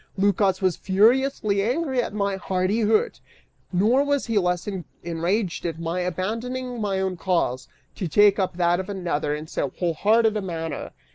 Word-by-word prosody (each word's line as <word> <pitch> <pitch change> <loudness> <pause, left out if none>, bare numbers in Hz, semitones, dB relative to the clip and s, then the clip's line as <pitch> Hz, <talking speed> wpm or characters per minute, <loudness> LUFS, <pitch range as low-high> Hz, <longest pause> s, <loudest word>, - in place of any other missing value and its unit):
Lycas 195 -1 +2
was 185 -3 +2
furiously 215 +1 +2
angry 260 +3 0
at - - -4
my 200 -1 -1
hardihood, 205 +3 +1 0.5
nor 220 +9 +3
was 285 -1 0
he 225 -3 +1
less 180 0 -1 0.4
enraged 175 +3 -1
at 165 -2 -3
my 165 +2 -2
abandoning 230 +7 -3
my 195 -2 0
own 190 -1 -1
cause, 170 -8 -1 0.3
to 185 - -4
take 205 +5 +5
up 185 -2 -1
that 175 0 +2
of 190 +1 -5
another, 170 -7 -1
in 150 +1 -6
so 145 -3 -2
wholehearted 215 +6 +2
a 210 - -1
manner. 165 -4 -4
195 Hz, 155 wpm, -24 LUFS, 175-220 Hz, 0.5 s, take